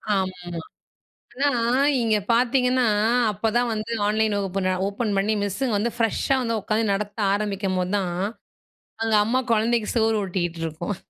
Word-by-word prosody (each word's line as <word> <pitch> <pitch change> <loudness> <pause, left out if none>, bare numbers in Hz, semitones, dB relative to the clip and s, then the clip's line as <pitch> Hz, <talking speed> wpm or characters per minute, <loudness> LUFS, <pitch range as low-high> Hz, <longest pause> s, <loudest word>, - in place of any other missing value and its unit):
ஆமாமா. 180 -3 -3 0.9
ஆனா 245 -4 +1 0.4
இங்கே 220 -2 +2
பார்த்தீங்கன்னா 250 +1 +2 0.5
அப்போ 210 +3 -2
தான் 240 0 +1
வந்து 215 +1 -4 0.2
ஆன்லைன், 215 0 +1
வகுப்பு 195 -1 -2
நா 185 - +2
ஓப்பன் 205 +1 -2
பண்ணி 205 +3 +1
மிஸ்ஸு 205 +7 -2
வந்து 225 +4 0
ஃப்ரெஷ்ஷா 230 +4 +1
வந்து 230 -2 -1
உட்காந்து 215 +2 0
நடத்த 205 +1 -4
ஆரம்பிக்கும்போது 195 -2 -1
தான். 180 -3 -2 0.9
அங்கே 220 -1 +3
அம்மா 245 +4 +1
குழந்தைக்கு 225 0 +1
சோறு 225 -1 +2
ஊட்டிக்கிட்டு 175 -3 -3
இருக்கும். 170 +6 -4
210 Hz, 140 wpm, -24 LUFS, 195-230 Hz, 0.9 s, அங்கே